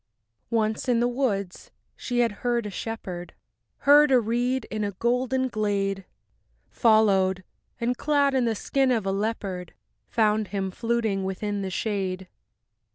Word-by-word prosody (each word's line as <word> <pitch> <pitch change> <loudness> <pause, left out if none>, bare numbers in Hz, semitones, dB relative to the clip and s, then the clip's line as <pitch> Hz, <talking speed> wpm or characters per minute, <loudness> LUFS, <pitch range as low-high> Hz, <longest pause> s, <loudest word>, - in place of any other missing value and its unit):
II - - 0
Once 220 +2 -1
in 240 -2 +3
the 240 - +2
woods 215 -8 -2 0.3
she 245 -1 -1
had 235 -2 +2
heard 240 -2 0
a 210 - -5
shepherd, 185 -5 -6 0.5
Heard 295 +1 +7
a 260 -2 +5
reed 240 +2 0
in 215 -1 -2
a 200 -1 -2
golden 250 +5 0
glade; 200 -4 -1 0.7
Followed, 195 -5 +3 0.4
and 240 +1 0
clad 285 0 +2
in 260 -2 +2
the 225 -1 0
skin 270 +5 +1
of 230 -5 +1
a 195 - 0
leopard, 195 -3 -3 0.3
Found 215 -1 +1
him 195 -1 -3
fluting 225 -2 -1
within 200 +2 -3
the 190 - -3
shade. 190 -2 -2
220 Hz, 150 wpm, -26 LUFS, 195-245 Hz, 0.7 s, Heard